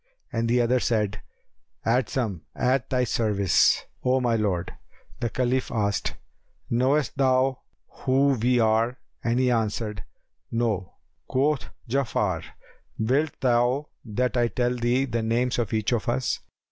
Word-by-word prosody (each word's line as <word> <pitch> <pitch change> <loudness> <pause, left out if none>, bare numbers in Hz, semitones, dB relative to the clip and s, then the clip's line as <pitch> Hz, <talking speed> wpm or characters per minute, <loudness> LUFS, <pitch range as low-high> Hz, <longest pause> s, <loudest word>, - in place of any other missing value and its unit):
and 115 0 0
the 120 +1 +3
other 120 +1 +3
said, 110 -4 0 0.6
"Adsum!—at 120 - 0
thy 125 -1 +2
service, 105 -6 +2 0.2
O 130 +1 +3
my 120 -2 +1
lord." 100 -6 -1 0.5
The 120 -2 -1
Caliph 130 +2 0
asked, 105 -3 -1 0.6
"Knowest 130 +5 +2
thou 130 0 +2 0.3
who 135 +1 +1
we 125 -1 +2
are?"; 115 +2 +2 0.3
and 120 +1 +1
he 130 -1 +3
answered, 110 -3 -1 0.5
"No." 110 -5 -1 0.3
Quoth 140 +2 +1 0.2
Ja'afar, 110 -9 0 0.5
"Wilt 135 +7 0
thou 125 +3 +2
that 125 +3 -1
I 120 -1 +3
tell 125 +1 0
thee 125 +2 +1
the 115 -3 -2
names 120 +2 0
of 115 -4 -1
each 110 0 0
of 120 -1 -1
us?" 125 +1 0
120 Hz, 130 wpm, -25 LUFS, 110-130 Hz, 0.6 s, the